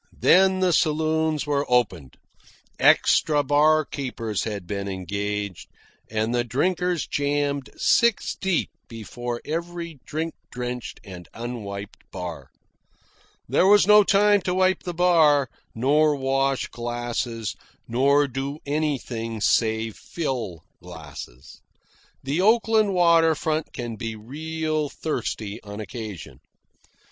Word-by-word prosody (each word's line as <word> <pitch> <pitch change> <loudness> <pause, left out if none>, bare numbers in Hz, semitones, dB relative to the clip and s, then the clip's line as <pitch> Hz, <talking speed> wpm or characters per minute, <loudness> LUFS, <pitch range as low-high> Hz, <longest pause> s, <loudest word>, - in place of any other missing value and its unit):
Then 190 0 +5
the 180 -2 +3
saloons 155 -1 +1
were 145 -1 0
opened. 95 - 0 0.6
Extra 150 -2 +4
barkeepers 140 -6 +1
had 105 -4 -4
been 100 +1 -4
engaged, 100 +1 -4 0.4
and 110 +2 -1
the 120 0 +1
drinkers 175 +7 0
jammed 145 -1 -1
six 235 -3 +2
deep 190 -4 -1 0.2
before 120 +1 -6
every 170 -1 -5
drink 160 +2 -3 0.2
drenched 125 -1 -5
and 90 -3 -10
unwiped 105 -4 -6
bar. 90 -3 -7 1.0
There 185 - +3
was 205 -1 +6
no 210 +1 +7
time 205 +1 +4
to 180 0 -1
wipe 185 0 +2
the 175 -1 -5
bar, 160 -6 +4 0.2
nor 145 +5 +3
wash 135 0 0
glasses, 120 -2 -3 0.3
nor 140 +4 +3
do 135 +2 -4
anything 130 -7 -2
save 110 0 +1
fill 115 - -4 0.2
glasses. 60 +2 -11 0.6
The 140 +6 0
Oakland 220 -1 +3
water 165 -2 +5
front 155 0 -2
can 120 -2 -6
be 115 -1 -4
real 155 +6 -3
thirsty 110 -9 -4
on 105 0 -9
occasion. 110 -4 -7
140 Hz, 110 wpm, -24 LUFS, 115-160 Hz, 1.0 s, no